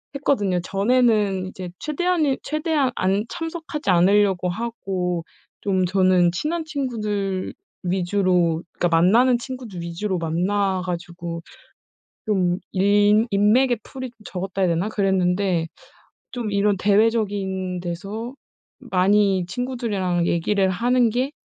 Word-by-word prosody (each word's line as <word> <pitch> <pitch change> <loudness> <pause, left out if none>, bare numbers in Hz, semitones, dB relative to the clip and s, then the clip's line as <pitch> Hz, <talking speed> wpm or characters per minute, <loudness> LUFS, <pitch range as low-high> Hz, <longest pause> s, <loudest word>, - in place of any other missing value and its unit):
했거든요. 205 -10 +1
전에는 205 -1 +2
이제 185 -1 -7
최대한은, 305 -2 0
최대한 305 -4 0
않 195 +2 +1
참석하지 325 - -5
않으려고 185 0 +3
하고 185 -5 -3 0.4
좀 190 -2 +1
저는 185 -1 +3
친한 315 - -2
친구들 210 -10 -3 0.3
위주로 180 -2 +1
그러니까 175 - 0
만나는 240 +9 +4
친구들 240 -7 -7
위주로 180 +3 -3
만나 185 +4 0
가지고 170 -1 -5 0.8
좀 185 -5 +1 0.2
인 205 +3 +4
인맥의 225 +4 +3
풀이 260 -1 -7
좀 235 - -27
적었다 190 +1 -4
해야 180 - +3
되나? 170 +4 0
그랬는데 190 -3 +1 0.6
좀 235 -4 -4
이런 200 0 +2
대외적인 200 -3 +1
데서 200 +8 -5 0.5
많이 195 -4 +2
친구들이랑 205 -7 -1
얘기를 190 +3 +1
하는 240 +5 +2
게 255 +4 -1
200 Hz, 270 characters per minute, -22 LUFS, 180-235 Hz, 0.8 s, 만나는